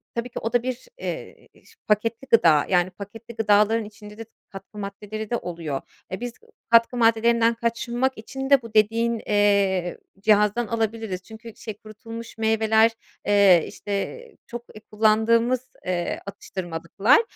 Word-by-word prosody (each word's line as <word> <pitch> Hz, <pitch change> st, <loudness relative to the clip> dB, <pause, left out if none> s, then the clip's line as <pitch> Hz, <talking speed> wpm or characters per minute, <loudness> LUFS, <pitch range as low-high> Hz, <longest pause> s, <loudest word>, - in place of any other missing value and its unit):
tabii 235 Hz, +1 st, -3 dB
ki -, -, -6 dB
o 225 Hz, -, -4 dB
da 245 Hz, -1 st, +2 dB
bir, 255 Hz, -, -4 dB
eee, -, -, -7 dB, 0.2 s
s -, -, -20 dB
paketli 225 Hz, +5 st, 0 dB
gıda. 160 Hz, -10 st, +5 dB
Yani, 180 Hz, -1 st, +3 dB
paketli 210 Hz, +5 st, -11 dB
gıdaların 215 Hz, +1 st, +3 dB
içinde 210 Hz, 0 st, -12 dB
de 225 Hz, -, -7 dB, 0.2 s
katkı 195 Hz, +2 st, -12 dB
maddeleri 210 Hz, +1 st, -6 dB
de 240 Hz, -, 0 dB
oluyor. 165 Hz, -7 st, -5 dB, 0.3 s
Eee, 190 Hz, -, -4 dB
biz 245 Hz, 0 st, -5 dB, 0.4 s
katkı 230 Hz, +2 st, +5 dB
maddelerinden 230 Hz, 0 st, +3 dB
kaçınmak 235 Hz, +3 st, -1 dB
için 270 Hz, +5 st, -6 dB
de 280 Hz, -2 st, +6 dB
bu 230 Hz, -2 st, -11 dB
dediğin, 225 Hz, +2 st, +2 dB
eee, 200 Hz, -3 st, +2 dB, 0.2 s
cihazdan 210 Hz, +2 st, +3 dB
alabiliriz. 220 Hz, -4 st, -2 dB
Çünkü 225 Hz, +1 st, -12 dB
şey, 220 Hz, -, -7 dB
kurutulmuş 225 Hz, +2 st, -10 dB
meyveler, 220 Hz, 0 st, +3 dB, 0.3 s
eee, 200 Hz, -5 st, +6 dB
işte, 205 Hz, -, -4 dB, 0.3 s
çok 240 Hz, 0 st, -7 dB, 0.3 s
kullandığımız, 230 Hz, +4 st, +2 dB
eee, 175 Hz, -1 st, -2 dB
atıştırmalıklar. 195 Hz, -, 0 dB
220 Hz, 140 wpm, -24 LUFS, 200-230 Hz, 0.4 s, de